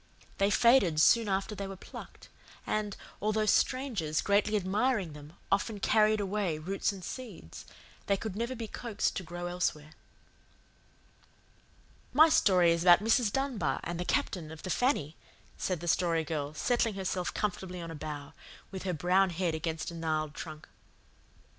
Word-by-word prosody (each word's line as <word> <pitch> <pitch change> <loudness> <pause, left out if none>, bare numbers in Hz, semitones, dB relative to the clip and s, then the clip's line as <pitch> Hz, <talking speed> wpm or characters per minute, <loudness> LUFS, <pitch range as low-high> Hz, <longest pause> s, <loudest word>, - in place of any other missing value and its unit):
They 200 0 +3
faded 205 -8 +4
soon 225 +6 +5
after 195 +2 -1
they 200 -1 -5
were 195 - -7
plucked; - - -11 0.4
and, 210 -2 -2 0.2
although 215 +1 +1
strangers, 215 - +1
greatly 205 +1 +2
admiring 205 - 0
them, 150 +1 -12 0.2
often 205 +2 0
carried 215 +1 +3
away 195 -5 -1
roots 190 +7 -1
and 195 -2 -9
seeds, 215 - -8 0.4
they 200 - +2
could 210 -1 -5
never 235 +4 -2
be 230 -2 -5
coaxed 230 -1 -2
to - - -2
grow 175 +1 -6
elsewhere. 175 -4 -2 2.2
"My 315 +5 +7
story 180 - +4
is 170 0 +1
about 175 0 +8
Mrs. 225 0 +3
Dunbar 230 - -1
and 175 0 -4
the - - -1
Captain 170 -2 -1
of 160 - -10
the 185 - -3
FANNY," 165 - 0 0.4
said 180 -4 -2
the 175 - -6
Story 165 -1 +2
Girl, 150 -1 -4
settling 235 +3 +1
herself 185 -2 -2
comfortably 185 -3 -3
on 165 -1 -6
a - - -6
bough, 150 -2 -7 0.4
with 190 -1 -6
her 180 - 0
brown 180 +4 +3
head 175 -1 -1
against 160 +1 -3
a - - -9
gnarled 155 -2 -2
trunk. 155 -1 -8
185 Hz, 160 wpm, -30 LUFS, 165-215 Hz, 2.2 s, about